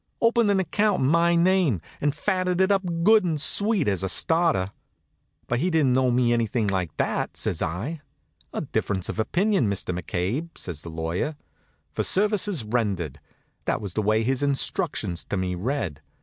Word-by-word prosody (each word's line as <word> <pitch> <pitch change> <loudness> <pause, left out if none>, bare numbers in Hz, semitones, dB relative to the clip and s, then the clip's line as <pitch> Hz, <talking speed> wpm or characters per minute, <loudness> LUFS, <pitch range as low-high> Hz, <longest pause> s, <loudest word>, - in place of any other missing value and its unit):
Opened 230 -1 +3
an 200 -1 +3
account 200 +3 +1
in 130 - +2
my 170 +2 +3
name, 170 - +3 0.2
and 145 0 +1
fatted 185 0 0
it 190 +1 +3
up 195 -1 +3 0.2
good 215 +2 +6
and 165 -4 -1
sweet, 200 +2 +3
as 100 -3 0
a 95 - -2
starter. 160 - +2 0.7
"But 120 - -1
he 175 +6 +1
didn't 150 -7 +2
owe 130 -1 +3
me 120 -1 +2
anything 115 -1 0
like 95 -5 -2
that," - - -1
says 80 - -2
I. 105 - -3 0.5
"A - - -3
difference 95 -3 -2
of - - -4
opinion, 175 - +1
Mr. 95 -2 -2
McCabe," 95 - -3
says 85 -5 -5
the 85 - -8
lawyer. 85 - -3 0.6
"'For - - -1
services 205 - +1
rendered,' 100 - -2 0.5
that - - 0
was 100 -4 -6
the 110 - 0
way 110 +2 +2
his 130 +3 0
instructions 140 - -1
to 105 - -3
me 95 -1 -1
read. 95 - -3
130 Hz, 175 wpm, -25 LUFS, -, 0.7 s, good